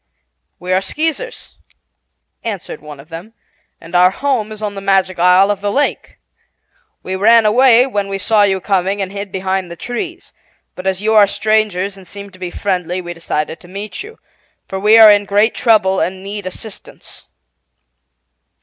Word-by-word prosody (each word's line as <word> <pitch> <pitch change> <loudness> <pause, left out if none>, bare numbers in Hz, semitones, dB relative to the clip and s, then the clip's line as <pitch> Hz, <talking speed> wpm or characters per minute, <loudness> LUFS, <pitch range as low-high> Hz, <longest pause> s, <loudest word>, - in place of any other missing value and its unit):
"We 180 +1 -3
are 185 - +2
Skeezers," 320 - -3 0.9
answered 200 -8 -6
one 150 -2 -11
of 145 +4 -15
them, 175 +7 -9 0.5
"and 165 - -14
our 180 +1 +5
home 235 0 -2
is 215 0 -8
on 210 -1 -3
the 195 - -7
Magic 190 -2 +1
Isle 180 +3 +5
of 200 -1 -4
the 205 0 -1
Lake. 285 +6 -1 0.9
We 190 - -4
ran 225 +3 +5
away 245 +2 +5
when 205 -7 -2
we 195 0 -3
saw 210 +2 +2
you 195 -2 +2
coming, 195 +1 -1
and 190 -1 -3
hid 200 -1 -6
behind 190 -1 -2
the 170 - -8
trees, 335 - -6 0.4
but 185 +1 -7
as 190 +1 -1
you 220 +1 +2
are 210 -2 +6
Strangers 205 -2 0
and 190 -2 -13
seem 200 +2 -9
to 185 - -17
be 180 -1 -5
friendly 180 -1 -2
we 175 -1 -6
decided 160 -1 -4
to - - -17
meet 200 +3 -7
you, 440 +3 -11 0.5
for 190 - -5
we 210 +3 +5
are 220 -1 +9
in 205 0 +3
great 205 +3 +2
trouble 205 -5 +2
and 185 +1 -3
need 200 -1 -6
assistance." 200 +3 -11
195 Hz, 175 wpm, -16 LUFS, 185-215 Hz, 0.9 s, are